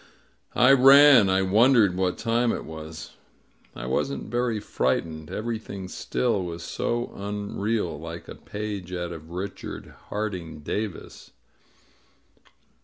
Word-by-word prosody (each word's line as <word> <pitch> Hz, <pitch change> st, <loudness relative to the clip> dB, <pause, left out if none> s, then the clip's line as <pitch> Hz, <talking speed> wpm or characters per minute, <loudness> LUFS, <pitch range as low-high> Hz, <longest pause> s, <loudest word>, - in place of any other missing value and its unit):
I 125 Hz, +2 st, +6 dB
ran. 135 Hz, -4 st, +8 dB
I 95 Hz, 0 st, +3 dB
wonder 115 Hz, +4 st, +5 dB
e< -, -, +1 dB
;l -, -, -6 dB
wh^^ 90 Hz, 0 st, 0 dB
time 120 Hz, +1 st, +1 dB
j -, -, +1 dB
t -, -, -5 dB
was. 80 Hz, 0 st, -9 dB, 0.6 s
I -, -, -6 dB
wasn't 70 Hz, +6 st, -2 dB
very 120 Hz, -2 st, 0 dB
frightened. 80 Hz, -5 st, -2 dB
Everything 110 Hz, -4 st, -5 dB
still 110 Hz, +2 st, -1 dB
was 85 Hz, -1 st, -6 dB
so 120 Hz, +6 st, -2 dB
unreal, 100 Hz, -3 st, -3 dB
like 85 Hz, +1 st, -8 dB
a -, -, -7 dB
page 105 Hz, -4 st, -6 dB
out 85 Hz, -1 st, -3 dB
of 80 Hz, -1 st, -9 dB
Richard 90 Hz, +4 st, -6 dB, 0.2 s
Harding 90 Hz, -7 st, -4 dB
Davis. 105 Hz, +5 st, -5 dB
100 Hz, 130 wpm, -25 LUFS, 85-115 Hz, 0.6 s, ran